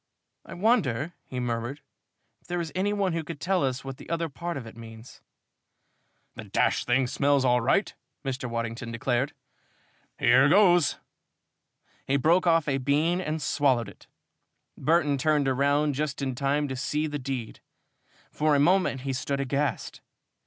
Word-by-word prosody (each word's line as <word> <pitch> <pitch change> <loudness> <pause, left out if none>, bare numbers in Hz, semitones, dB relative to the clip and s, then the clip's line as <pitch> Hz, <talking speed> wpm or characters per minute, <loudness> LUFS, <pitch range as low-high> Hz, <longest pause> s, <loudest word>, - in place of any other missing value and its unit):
"I - - -10
wonder," 175 - +1
he 130 - -5
murmured, 120 +3 -3 0.6
"if - - -25
there 175 0 -2
is 165 -2 -4
any 195 +3 0
one 200 -3 0
who 165 -1 -2
could 160 -1 -8
tell 185 0 +1
us 130 -1 -1
what 135 -1 -6
the - - -13
other 165 0 -1
part 170 +3 -5
of 130 - -7
it 110 - -11
means?" 115 0 -12 1.1
"The - - -9
d - - -17
d - - +3
thing 125 +2 +1
smells 140 +2 +1
all 125 -1 +3
right," 135 - +1 0.3
Mr. 130 -2 -3
Waddington 115 +1 -4
declared. 125 +3 -1 0.8
"Here 130 +4 +5
goes!" 175 -4 +4 1.1
He 140 - +2
broke 170 +6 +3
off 165 -2 +3
a 135 -2 +1
brown 130 - -6
bean 155 +6 +1
and 155 -2 -3
swallowed 130 -7 +1
it. 100 - -17 0.7
Burton 150 -4 +1
turned 150 0 +2
round 140 +3 +2
just 145 +1 -3
in 135 -2 -2
time 140 +3 0
to 130 - -3
see 150 +4 -1
the 150 -1 -3
deed. 130 -4 -5 0.7
For 150 -1 +2
a - - +3
moment 175 -3 +2
he 135 0 -3
stood 140 +2 -2
aghast. 140 +2 -2
140 Hz, 165 wpm, -27 LUFS, 130-160 Hz, 1.1 s, Here